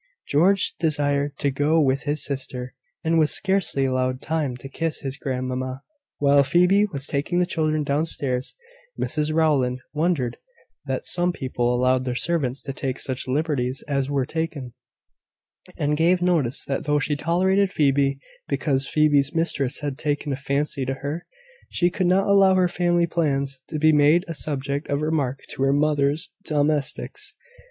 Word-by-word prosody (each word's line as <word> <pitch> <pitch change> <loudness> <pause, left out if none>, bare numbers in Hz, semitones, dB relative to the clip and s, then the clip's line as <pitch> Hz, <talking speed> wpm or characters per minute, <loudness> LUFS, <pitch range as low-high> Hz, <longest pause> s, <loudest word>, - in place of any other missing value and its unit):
George 185 +7 +3
was 160 -2 +2
desired 145 -1 0
to 140 - 0
go 145 +4 +2
with 135 -2 +2
his 150 +1 +1
sister, 130 -3 -3 0.3
and 165 0 +2
was 155 -1 +4
scarcely 190 -8 +1
allowed 130 0 0
time 150 -6 -2
to 130 - -9
kiss 160 +3 -3
his 135 -1 -4
grandmamma. 130 -1 -4 0.3
While 140 0 +4
Phoebe 180 +8 +3
was 140 -8 -3
taking 145 +5 -1
the 180 - +3
children 155 -3 0
down 145 +3 0
stairs, 130 -5 -3 0.4
Mrs 150 0 0
Rowland 145 -6 +2
wondered 150 -6 0 0.5
that - - -3
some 175 0 +2
people 125 -6 -1
allowed 125 +1 +2
their 125 -1 -2
servants 140 -4 0
to 135 - -5
take 130 0 -3
such 130 -1 -3
liberties 135 -2 -1
as 140 -2 -1
were 140 -2 0
taken; 155 -5 -4 1.0
and 150 +1 0
gave 170 +4 +3
notice 165 -8 0
that 140 +4 -3
though 150 0 +2
she 145 0 0
tolerated 185 +5 +1
Phoebe, 140 -3 +2 0.3
because 135 -2 0
Phoebe's 145 -1 +2
mistress 150 -5 0
had 145 -1 -4
taken 145 -1 -1
a - - -1
fancy 140 +1 -1
to 135 +1 -2
her, 145 +5 -5 0.4
she 175 0 +1
could 185 -1 0
not 190 +2 +3
allow 195 -1 +5
her 185 -1 +3
family 175 -1 +1
plans 140 -5 -1
to 155 - -3
be 155 +1 +4
made 150 +5 +4
a 165 - -4
subject 140 -1 -3
of 145 +1 0
remark 145 -4 -1
to - - -6
her 135 0 +3
mother's 150 +3 +1
domestics. 150 -3 -1
145 Hz, 165 wpm, -23 LUFS, 135-160 Hz, 1.0 s, allow